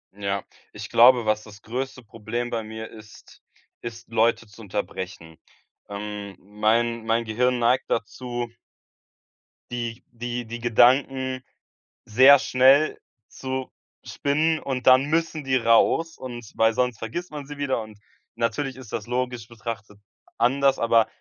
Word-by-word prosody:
Ja, 100 -1 -2 0.3
ich - - -8
glaube, 120 0 +6
was 110 0 +1
das 105 -1 -14
größte 130 +2 -5
Problem 120 +2 -5
bei 115 -1 -1
mir 110 +1 -7
ist, 110 -1 -15 0.4
ist 115 -1 -8
Leute 115 +1 +2
zu 105 +2 -15
unterbrechen. 95 -5 -6 0.5
Ähm, 100 -1 -6
mein 110 +3 0
mein 115 +1 +1
Gehirn 125 +3 +1
neigt 120 +2 +1
dazu 120 +1 -3 1.2
die 120 -1 -4
die 120 0 -4
die 120 +1 -7
Gedanken 130 +2 +3 0.6
sehr 130 +6 +7
schnell 135 +4 +4 0.3
zu 130 0 -5 0.3
spinnen 155 +3 0
und 130 -2 -4
dann 130 +2 +7
müssen 160 -1 -1
die 130 -1 +1
raus 125 +8 +3
und 120 -3 -8
weil 110 0 +3
sonst 125 -2 0
vergisst 160 +11 -5
man 145 -2 -7
sie 145 -1 -8
wieder 135 -5 -1
und 110 -1 -11 0.4
natürlich 130 +4 -1
ist 130 -5 -12
das, 110 0 -4
logisch 125 -2 -2
betrachtet, 110 -3 -7 0.4
anders, 135 +3 +3
aber 115 -1 +3
120 Hz, 135 wpm, -24 LUFS, 110-130 Hz, 1.2 s, sehr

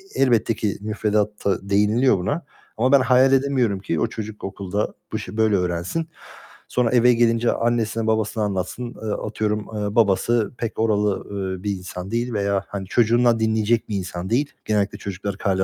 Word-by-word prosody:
elbette 120 -4 +3
ki 105 -2 -2
müfredatta 105 -2 -1
değiniliyor 105 +4 +3
buna 140 - -2 0.3
ama 125 +4 +2
ben 140 -2 +7
hayal 130 +1 +4
edemiyorum 130 -7 +2
ki 85 -5 -2
o - - +2
çocuk 110 -1 -7
okulda 100 +1 -3 0.2
bu 110 - -1
işi 110 0 -7
böyle 110 -2 +3
öğrensin. 90 - -1 0.6
Sonra 125 -2 +1
eve 125 0 +5
gelince 115 0 +2
annesine 115 -1 0
babasına 110 0 0
anlatsın. 105 +5 -3
Eee, - - -4
atıyorum, 105 0 -1 0.2
eee, 105 +1 -3
babası 110 0 +2
pek 115 -2 -4
oralı, 105 -2 +1 0.3
eee, 90 - -11
bir 105 - -1
insan 90 0 -6
değil 120 +1 -1
veya 100 -2 0
hani 100 -2 -5
çocuğundan 120 +1 +3
dinleyecek 110 +1 +1
bir 105 - -2
insan 90 -1 -5
değil. 140 +5 +1
Genellikle 105 -2 0
çocukları 100 0 -5
kâale 95 -1 +1
110 Hz, 165 wpm, -22 LUFS, 100-120 Hz, 0.6 s, ben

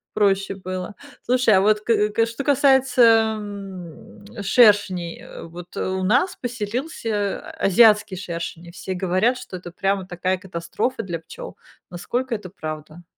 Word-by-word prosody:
проще 195 -2 +1
было. 185 +1 -6 0.3
Слушай, 250 -3 +3
а - - +4
вот 210 +1 +3
к 210 -1 +2
к 225 +2 +2
что 230 +4 -5
касается, 255 -5 +4
ам, 195 -3 -9 0.2
шершней, 200 -5 +3
э, - - -10
вот 175 +1 -11
у 185 0 -2
нас 250 - +2
поселился 225 -3 -3 0.2
азиатский 210 -1 +4
шершень, 170 -1 -6
и - - -11
все 185 +2 -5
говорят, 190 +7 +1
что 220 -7 -8
это 175 -1 -9
прямо 195 +1 -1
такая 185 +1 -1
катастрофа 195 +7 -3
для 170 -3 -4
пчёл, - - -10 0.3
насколько 245 +8 -3
это 205 -4 -5
правда? 155 -1 -8
200 Hz, 140 wpm, -22 LUFS, 180-230 Hz, 0.3 s, а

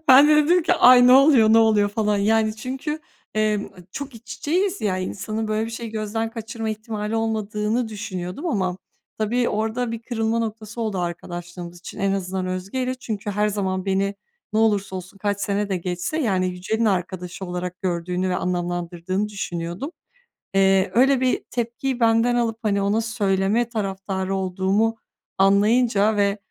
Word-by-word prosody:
Ben 275 +3 +9
de 305 - +6
dedim 335 +4 +4
ki: 340 - +2
"Ay, 250 -6 +7
ne 250 - +7
oluyor, 265 -5 +6
ne 225 - +7
oluyor 215 -2 +4
falan?" 210 0 0
Yani, 215 +1 +2
çünkü, 265 +7 -4 0.4
eee, 215 -1 0 0.2
çok 280 -3 -6
iç 235 +1 -9
içeyiz 370 +8 0
ya, 190 -3 0
insanın 215 +4 -3
böyle 215 +1 0
bir - - -6
şeyi 230 0 -6
gözden 220 +1 -2
kaçırma 225 -1 -5
ihtimali 215 0 -4
olmadığını 220 +1 -1
düşünüyordum 200 - -5
ama 185 - 0 0.4
tabii 235 +3 +1
orada 225 +3 -1
bir 230 0 -5
kırılma 230 -1 -1
noktası 225 0 -4
oldu 215 -4 -1
arkadaşlığımız 175 0 -6
için. 175 - -10
En 195 0 +1
azından 190 -1 -2
Özge'yle. 200 +8 -2
Çünkü 215 -5 -5
her 210 +1 +1
zaman 190 -2 -2
beni 195 +1 0 0.4
ne 215 - +1
olursa 200 -3 +2
olsun, 185 +2 -9
kaç 205 0 -1
sene 205 0 -1
de 190 - 0
geçse, 180 - -3
yani, 195 -10 +1
Yücel'in 185 +6 -2
arkadaşı 185 -2 -2
olarak 180 0 -5
gördüğünü 180 0 -1
ve 180 - 0
anlamlandırdığını 175 +2 -2
düşünüyordum. 175 - -4 0.6
Eee, 195 -1 +3
öyle 260 +3 +4
bir 255 -1 +1
tepkiyi 240 +2 -2
benden 230 +1 +3
alıp, 230 -2 0
hani, 200 -2 +1
ona 205 +3 +1
söyleme 215 0 +1
taraftarı 195 -3 -3
olduğumu 190 +4 +1 0.4
anlayınca 210 +2 +4
ve 200 0 +2
210 Hz, 160 wpm, -23 LUFS, 190-230 Hz, 0.6 s, Ben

